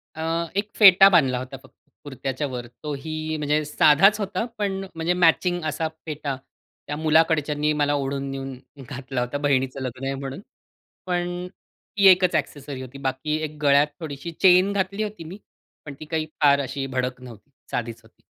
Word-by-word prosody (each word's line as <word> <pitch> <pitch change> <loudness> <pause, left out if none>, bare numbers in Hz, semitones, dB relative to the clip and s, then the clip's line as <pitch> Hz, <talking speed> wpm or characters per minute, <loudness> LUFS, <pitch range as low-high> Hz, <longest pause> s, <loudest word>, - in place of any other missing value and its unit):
अ, 160 - -6 0.3
एक 205 +1 -1
फेटा 195 -2 +8
बांधला 135 -9 +3
होता 130 +1 -7
फक्त, - - -19 0.3
कुर्त्याच्यावर 130 -2 -4 0.2
तो 150 -1 -3
ही, 155 +1 -4
म्हणजे 150 +1 0
साधाच 155 +8 +5
होता, 200 +1 -2
पण 195 -2 -2
म्हणजे 165 +2 0
मॅचिंग 175 0 +2
असा 155 +1 -1 0.2
फेटा. 150 -3 -4 0.5
त्या 145 - -3
मुलाकडच्यानी 155 -1 +2
मला 145 0 +2
ओढून 140 -1 -2
घेऊन 135 -1 -6 0.3
घातला 135 -2 -4
होता, 125 +3 -2
बहिणीचं 135 -2 0
लग्न 130 +1 -5
आहे 135 - -1
म्हणून. 135 0 -6 0.7
पण 175 0 -2 0.5
ती 200 - +6
एकच 185 -1 +5
ॲक्सेसरीज 140 -2 -3
होती. 130 +2 -10
बाकी 135 +3 -2
एक 155 -1 -5
गळ्यात 145 +1 +4
थोडीशी 155 +1 -6
चेन 185 +1 +6
घातली 195 +2 -1
होती 210 -5 -6
मी. 180 +5 -9 0.5
पण 145 - -7
ती 155 - -8
काही 155 0 -2 0.2
फार 140 -1 +5
अशी 135 0 -4
भडक 130 -1 -3
नव्हती. 125 +1 -13 0.2
साधीच 115 -1 -4
होती. - - -24
150 Hz, 165 wpm, -24 LUFS, 135-175 Hz, 0.7 s, फेटा